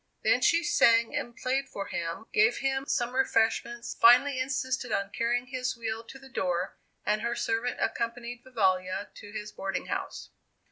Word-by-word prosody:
Then - - +3
she 335 +1 +4
sang 230 -7 +4
and 240 -5 -3
played 265 +2 -1
for 200 - -5
him, 170 +5 -4
gave 435 +2 +4
him 270 0 -1
some 245 -1 0
refreshments, 235 -2 +1
finally 255 +3 +6
insisted 260 -2 -2
on 200 -1 -1
carrying 240 +3 0
his 255 0 -3
wheel 225 -1 -4
to 265 - -11
the 270 0 -14
door, 180 -6 -2 0.3
and 210 0 +1
her 235 +1 -1
servant 230 +2 -1
accompanied 235 +1 -3
Vivalla 190 -6 0
to 205 - -11
his 210 0 -6
boarding 195 0 -3
house. - - -5
235 Hz, 160 wpm, -29 LUFS, 215-260 Hz, 0.3 s, finally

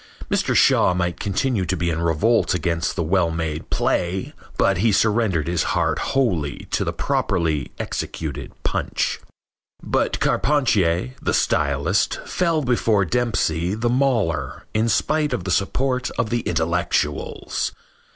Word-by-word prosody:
Mr. - - +1
Shaw 90 - +4
might 90 -1 -1
continue 105 +1 0
to 95 +1 -1
be 85 0 0
in 80 +1 -2
revolt 85 +6 +2
against 85 -1 -1
the 85 - -1
well 85 +1 +2
made 80 -1 -4
play, 90 +2 -1 0.2
but - - +3
he 115 - +3
surrendered 105 -6 +2
his 85 -1 0 0.2
heart - - +1
wholly 95 - -1
to - - +1
the - - -1
properly 75 -6 -1
executed 70 -4 -4
punch. - - -1 0.6
But - - 0
Carpentier, 95 - +1
the - - 0
stylist, 70 +6 +1
fell 165 -4 0
before 115 -5 +2
Dempsey, 95 -5 0
the 115 +2 0
mauler, 120 -10 0
in 110 +1 +1
spite 150 +6 +1
of 125 - -2
the 95 - -3
support 125 +7 0
of 110 - -1
the 120 - +1
intellectuals. 80 -6 -1
90 Hz, 135 wpm, -22 LUFS, 80-120 Hz, 0.6 s, Shaw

